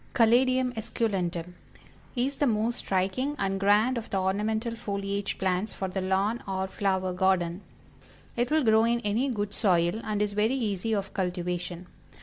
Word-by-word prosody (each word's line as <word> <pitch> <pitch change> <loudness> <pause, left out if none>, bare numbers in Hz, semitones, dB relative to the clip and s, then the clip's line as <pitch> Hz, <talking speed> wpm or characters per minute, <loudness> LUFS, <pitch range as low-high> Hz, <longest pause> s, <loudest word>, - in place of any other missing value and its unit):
CALADIUM 255 +1 +4
ESCULENTUM, 185 -6 -2 0.6
Is 265 +3 -1
the 290 - +3
most 230 +1 0
striking 195 +10 -1
and 195 -2 -1
grand 210 +5 +3
of 225 - -10
the 195 - 0
Ornamental 220 +5 -1
Foliage 200 -2 -3
Plants 190 +2 -1
for 190 - -3
the 190 +1 -3
lawn 195 +5 0
or 190 -1 -1
flower 190 -1 -1
garden. 180 -1 +1 0.7
It 240 +1 0
will 310 -1 +3
grow 220 -1 +5
in 235 +1 +1
any 230 +5 0
good 205 -4 -2
soil, 180 0 +2
and 210 -1 -2
is 205 -1 0
very 215 +5 +2
easy 220 -3 -1
of 200 -1 -3
cultivation. 180 -1 -3
205 Hz, 155 wpm, -28 LUFS, 190-230 Hz, 0.7 s, grow